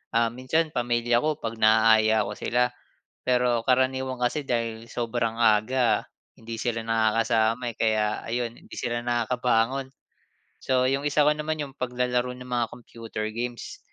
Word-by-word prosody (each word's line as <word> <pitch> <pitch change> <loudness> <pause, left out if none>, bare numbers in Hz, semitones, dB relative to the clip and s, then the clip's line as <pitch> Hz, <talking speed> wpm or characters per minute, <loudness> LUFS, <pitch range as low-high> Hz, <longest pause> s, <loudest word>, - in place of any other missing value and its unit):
ah, 115 0 +4
minsan 155 +6 0
pamilya 120 0 +1
ko 155 -1 +1
pag 115 0 -4
naaya 110 0 +5
ko - - -4
sila, 125 +1 +1 0.6
pero 125 -2 +2
karaniwan 130 0 +1
kasi 140 +4 0
dahil 115 -3 -2
sobrang 115 -1 -1
aga 115 +3 +3 0.3
hindi 115 0 -7
sila 115 -2 -2
nakakasama, 115 +1 +1
eh, - - -32
kaya 110 -1 +2 0.2
ayon 120 0 -2
hindi - - -13
sila 120 -1 -2
nakakabangon. 120 +2 0 0.7
So, 130 -1 +1
yung 140 +2 -1
isa 145 +1 +3
ko 150 - +5
naman 150 0 -3
yung 140 -2 -7
paglalaro 125 0 -1
ng 125 0 -11
mga 120 -1 +1
computer 115 -2 -7
games, 120 +1 -5
120 Hz, 145 wpm, -26 LUFS, 115-125 Hz, 0.7 s, naaya